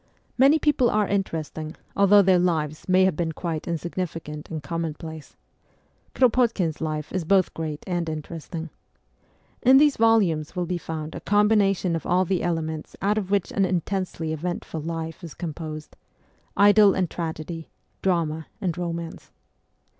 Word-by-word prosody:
Many 275 +4 +6
people 290 -5 +2
are 210 -1 +1
interesting, 160 -5 -3 0.2
although 200 +1 +6
their 185 -1 +4
lives 155 -3 -1
may 185 +1 +5
have 190 -4 +1
been 160 0 -2
quite 160 -2 -4
insignificant 165 -2 -4
and 155 -3 -5
commonplace. 160 0 -5 0.8
Kro 260 - +6
potkin's 220 -10 0
life 155 -1 -3
is 185 -2 -1
both 190 +2 +3
great 155 -2 -5
and 175 -3 -2
interesting. 160 +1 -6 0.9
In 260 +2 +7
these 290 0 +5
volumes 195 -10 +2
will 180 -1 -1
be 175 0 -2
found 160 -1 -5
a - - -5
combination 205 -4 +3
of 165 - -4
all 185 +1 +3
the 185 0 0
elements 160 -2 -3
out 210 +2 +1
of 190 -3 -5
which 200 -2 +1
an 200 - +1
intensely 180 -3 -2
eventful 165 0 -4
life 165 +2 -5
is 165 -4 -8
composed 155 -2 -6 0.6
idyll 205 0 +6
and 185 -2 +1
tragedy, 165 0 -5 0.3
drama 160 -4 0
and 180 -5 -2
romance. 170 -1 -5
170 Hz, 145 wpm, -25 LUFS, 160-195 Hz, 0.9 s, In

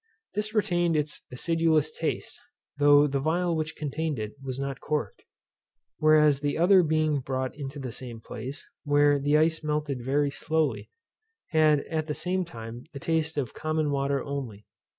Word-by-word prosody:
This 215 +1 -2
retained 175 -5 +2
its 150 0 -3
acidulous 160 +2 +1
taste, - - -3 0.4
though 145 0 +7
the 140 -1 -1
phial 170 +3 +1
which 160 0 -3
contained 150 0 -2
it 105 0 -4
was 135 -1 -5
not 140 -1 -3
corked; 145 -9 -3 0.8
whereas 150 -2 +5
the 145 -1 -1
other 180 +3 +6
being 155 -2 +1
brought 130 0 -3
into 140 -1 -6
the 130 -3 -5
same 120 -1 -7
place, 130 +5 -7 0.2
where 145 -1 +4
the 145 +2 +3
ice 160 +1 +2
melted 150 -4 -2
very 140 +2 +1
slowly, 155 +1 -1 0.6
had 155 -3 +4
at 155 0 -3
the 150 - -2
same 185 +1 -1
time 115 -5 -9
the 140 - -6
taste 160 +1 -1
of 130 -6 -2
common 155 -1 -1
water 140 -1 0
only. 130 -8 -5
150 Hz, 160 wpm, -27 LUFS, 135-160 Hz, 0.8 s, though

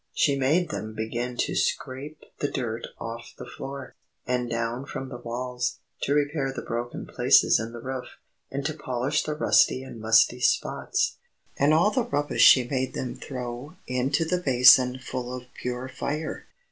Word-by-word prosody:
She 140 - +2
made 150 +7 +2
them 110 0 -5
begin 120 +3 -3
to - - 0
scrape 140 +4 -2 0.2
the 145 - 0
dirt 115 -2 -3
off 115 +1 -7
the - - -8
floor, 135 -1 -8 0.3
and 125 -1 -1
down 115 +3 -2
from 135 -3 -5
the 120 - -7
walls, 125 +1 -3 0.2
to 140 - +1
repair 145 -2 0
the - - -6
broken 120 +1 -4
places - - +4
in 115 0 -4
the 120 - -8
roof, 130 0 -5 0.4
and 140 0 -4
to 155 - 0
polish 135 0 -1
the 150 - -3
rusty 130 -3 +3
and 130 -3 -9
musty 110 +2 +4
spots. - - +1 0.4
And 140 +2 +3
all 170 +7 +4
the 255 - +1
rubbish 145 +1 -1
she 125 -2 +8
made 130 -1 -2
them 125 -2 -3
throw 125 +3 -6
into 130 +5 0
the 180 +2 0
basin 125 -2 +6
full 125 -1 -5
of 125 0 -13
pure 125 +1 -4
fire. 150 +4 -4
130 Hz, 170 wpm, -26 LUFS, 120-140 Hz, 0.4 s, she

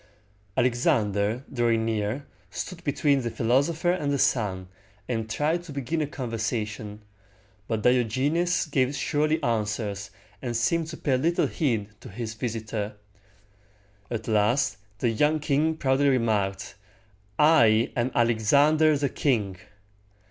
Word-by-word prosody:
Alexander, 110 -2 +1
drawing 115 -3 +1
near, 110 +5 -2 0.2
stood 180 -2 -6
between 145 -2 +2
the 120 - -2
philosopher 140 +10 +1
and 150 -6 -1
the 140 - +1
sun, 95 -9 0 0.4
and 115 -3 -2
tried 155 +9 0
to 170 -3 -11
begin 140 +3 -2
a 150 - -1
conversation; 110 -5 -4 0.6
but 110 -2 -2
Diogenes 130 +9 +2
gave 140 -2 0
surly 155 +2 +1
answers, 105 -3 -2 0.3
and 120 -2 -2
seemed 160 +8 +1
to 160 - -7
pay 135 -4 +1
little 165 +6 +1
heed 115 - -1
to - - -11
his 110 +2 -5
visitor. 110 -2 -4 1.1
At 115 -2 -4
last 110 +3 +2 0.2
the 120 - +1
young 150 +7 +2
king 155 +2 +1
proudly 140 0 +2
remarked, 110 -6 0 0.6
"I 120 -8 +5
am 120 +1 +1
Alexander 145 +7 +4
the 140 0 0
king!" 105 -11 0
120 Hz, 125 wpm, -26 LUFS, 110-145 Hz, 1.1 s, I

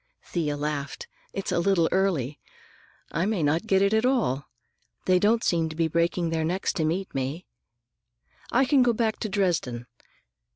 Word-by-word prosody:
Thea 150 -4 -2
laughed. 145 -1 -4 0.2
"It's 195 - -4
a - - +1
little 170 -2 +3
early. 170 -8 0 0.7
I 180 - 0
may 210 -7 0
not 160 +8 +1
get 195 -2 +4
it 200 +2 +2
at 220 +1 +3
all. 225 - +1 0.6
They 185 -1 +4
don't 225 +4 +3
seem 165 -2 +1
to 155 - -8
be 165 0 +1
breaking 170 +1 0
their 160 -1 0
necks 180 +4 -1
to 170 - -1
meet 185 +5 -2
me. 135 +6 -3 1.1
I 260 +3 +4
can 275 0 +4
go 245 -1 +4
back 220 -1 0
to 220 - -3
Dresden." 170 - 0
175 Hz, 170 wpm, -26 LUFS, 155-200 Hz, 1.1 s, get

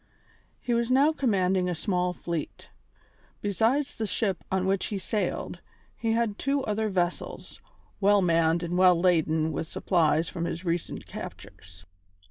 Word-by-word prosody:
He 245 - -2
was 235 0 +1
now 275 +4 +5
commanding 190 -10 +1
a 175 - -1
small 180 0 0
fleet. 170 -3 -5 0.7
Besides 225 +8 +1
the 220 - -2
ship 195 -2 -1
on 190 -1 +1
which 190 0 0
he 205 - -3
sailed, 205 +3 -3 0.3
he 225 -1 -1
had 225 -3 0
two 275 0 0
other 215 +1 -1
vessels, 180 -2 -3 0.4
well 200 0 +4
manned 165 0 +2
and 175 +1 -1
well 180 -2 +6
laden 160 -3 +2
with 160 +2 -3
supplies 165 -2 +1
from 170 - -4
his 170 +2 -4
recent 170 -1 -2
captures. 85 -2 -10
185 Hz, 145 wpm, -27 LUFS, 170-220 Hz, 0.7 s, well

